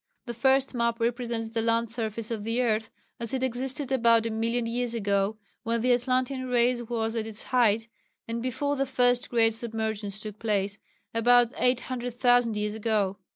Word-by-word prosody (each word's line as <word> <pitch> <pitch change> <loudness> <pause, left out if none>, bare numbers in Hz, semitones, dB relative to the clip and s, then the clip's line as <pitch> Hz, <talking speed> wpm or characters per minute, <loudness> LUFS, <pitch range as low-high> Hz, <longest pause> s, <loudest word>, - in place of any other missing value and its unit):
The 240 - -5
first 265 +3 +2
map 235 -1 0
represents 235 -1 -1
the 225 0 -2
land 230 0 +1
surface 225 -1 -3
of 220 -3 -3
the 230 +3 -1
earth 225 -1 0 0.3
as 235 +2 -2
it 260 - -2
existed 260 +2 -2
about 230 -3 +4
a 230 - -1
million 230 +2 -1
years 235 0 -2
ago, 200 -1 0 0.2
when 230 -1 -1
the 250 +1 +4
Atlantean 255 +1 0
Race 245 0 +2
was 225 -1 -2
at 220 -1 -2
its 220 -1 -8
height, 230 -3 +2 0.4
and 230 +1 -3
before 285 +4 -1
the 275 -1 -1
first 245 -1 +2
great 225 -2 +3
submergence 220 -3 -3
took 215 -1 -7
place 205 -2 -1 0.3
about 240 +1 +4
800,000 245 -2 +1
years 210 0 -1
ago. 210 -3 0
230 Hz, 170 wpm, -27 LUFS, 220-245 Hz, 0.4 s, about